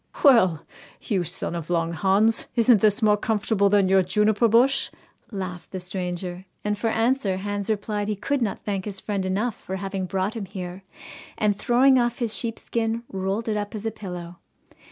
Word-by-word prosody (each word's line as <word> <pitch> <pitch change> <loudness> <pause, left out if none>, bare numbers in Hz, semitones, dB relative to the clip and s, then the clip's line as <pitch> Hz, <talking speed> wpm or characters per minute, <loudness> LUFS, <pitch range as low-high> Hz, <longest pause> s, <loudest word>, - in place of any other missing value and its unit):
'Well! 185 - +5 0.4
you 190 -4 0
son 170 - -3
of 170 -2 -5
Long 170 -1 0
Hans, 200 +5 +2
isn't 230 -3 +5
this 215 +2 +3
more 210 -1 +5
comfortable 210 -1 +1
than 200 -1 +4
your 190 0 +5
juniper 210 +5 +2
bush?' 250 +5 +3 0.4
laughed 185 -4 -6
the 185 - -5
stranger, 180 0 -4 0.2
and 210 0 0
for 210 +3 -2
answer 225 -3 +1
Hans 205 +1 -4
replied 205 -1 -1
he 210 - -1
could 280 +7 -1
not 210 -4 -2
thank 195 -3 -2
his 200 -2 -5
friend 200 -3 -2
enough 210 +5 0
for 190 - -6
having 195 -1 -3
brought 190 +3 -1
him 220 -4 -5
here, 185 -1 -7 0.6
and, 210 -1 +2
throwing 255 +5 +4
off 240 0 0
his 230 -3 -1
sheepskin, 230 0 -2
rolled 195 +4 -2
it 215 - 0
up 205 +1 -4
as 215 +1 -6
a 225 - 0
pillow. 180 -5 -8
205 Hz, 180 wpm, -24 LUFS, 190-225 Hz, 0.6 s, Well